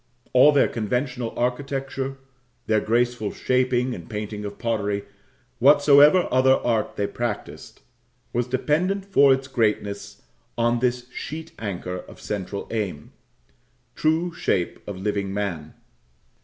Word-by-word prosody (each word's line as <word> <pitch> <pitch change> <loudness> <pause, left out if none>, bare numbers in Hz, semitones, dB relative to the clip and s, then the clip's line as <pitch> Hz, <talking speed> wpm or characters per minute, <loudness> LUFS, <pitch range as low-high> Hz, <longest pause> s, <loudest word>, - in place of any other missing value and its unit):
All 130 +4 +7
their 145 -2 +4
conventional 125 +2 -2
architecture 135 +1 -2 0.5
their 110 -1 +2
graceful 120 -2 0
shaping 125 0 +1
and - - -9
painting 105 -1 -5
of 100 0 -6
pottery 105 -3 -1 0.5
whatsoever 145 +5 +6
other 130 +1 +5
art 115 -5 -1
they 100 - 0
practised 120 0 -5 0.5
was 120 +1 0
dependent 165 +10 0
for 140 -9 +5
its 135 0 +1
greatness 105 -5 -2 0.3
on 120 0 +2
this 125 0 -1
sheet 160 +4 -7
anchor 90 -4 -4
of - - -12
central 100 -1 -4
aim: 100 -10 -3 0.8
true 165 +3 0
shape 90 - -1
of 100 -2 -5
living 100 0 -2
man. 90 -7 -4
120 Hz, 120 wpm, -24 LUFS, 105-135 Hz, 0.8 s, All